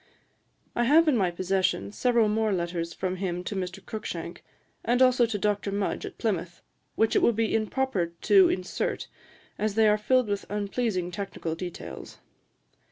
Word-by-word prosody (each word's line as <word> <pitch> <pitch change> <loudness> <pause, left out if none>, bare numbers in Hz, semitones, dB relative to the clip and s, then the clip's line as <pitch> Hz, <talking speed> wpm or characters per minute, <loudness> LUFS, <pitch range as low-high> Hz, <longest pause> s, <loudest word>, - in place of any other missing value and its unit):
I 240 - +2
have 315 +6 +5
in 300 - +4
my 190 -6 +2
possession 180 - 0
several 235 - +2
more 215 0 +1
letters 170 -2 -2
from 185 +2 -3
him 180 -2 -3
to 200 - -4
Mr. 185 0 -5
Cruikshank, 220 -2 -6 0.4
and 245 +1 +2
also 255 -2 +5
to 220 -2 -2
Dr. 205 0 0
Mudge 200 0 -2
at - - -11
Plymouth, 180 -6 -3 0.3
which 225 0 +2
it - - +4
would 235 - +4
be 225 0 0
improper 225 -3 0
to 385 -3 +6
insert, 185 - -2 0.5
as 210 -1 -1
they 220 -1 +5
are 210 0 +3
filled 255 +2 +2
with 200 -1 -2
unpleasing 205 -3 -1
technical 175 -3 -4
details. 175 +1 -7
205 Hz, 165 wpm, -27 LUFS, 185-230 Hz, 0.5 s, to